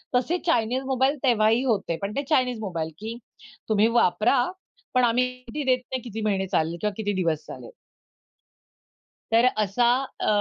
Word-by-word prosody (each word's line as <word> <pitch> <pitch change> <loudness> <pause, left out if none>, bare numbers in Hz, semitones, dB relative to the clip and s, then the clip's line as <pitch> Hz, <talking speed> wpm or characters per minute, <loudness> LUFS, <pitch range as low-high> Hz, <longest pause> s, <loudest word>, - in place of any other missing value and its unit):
तसे 310 +9 +1
Chinese 245 -4 +1
mobile 265 +2 +1
तेव्हाही 225 -1 +3
होते. 210 -9 0
पण 200 +1 -4
ते 280 - -1
चायनीज 250 -6 +2
मोबाईल, 170 -6 -3
की 225 +2 -6 0.5
तुम्ही 215 +1 +4
वापरा, 195 +9 +3 0.6
पण 255 -1 +3
आम्ही 245 +1 +3
गॅरेंटी 250 +3 -7
देत 255 - +3
नाही 260 -1 -2
किती 225 -2 -6
महिने 195 -2 0
चालले 170 -3 0
किंवा 210 -1 -1
किती 205 -2 -1
दिवस 160 -3 -1
चालले. - - -9 1.6
तर 230 +2 +5
असा 215 +3 +1 0.3
अ, - - -1
225 Hz, 155 wpm, -25 LUFS, 205-255 Hz, 1.6 s, तर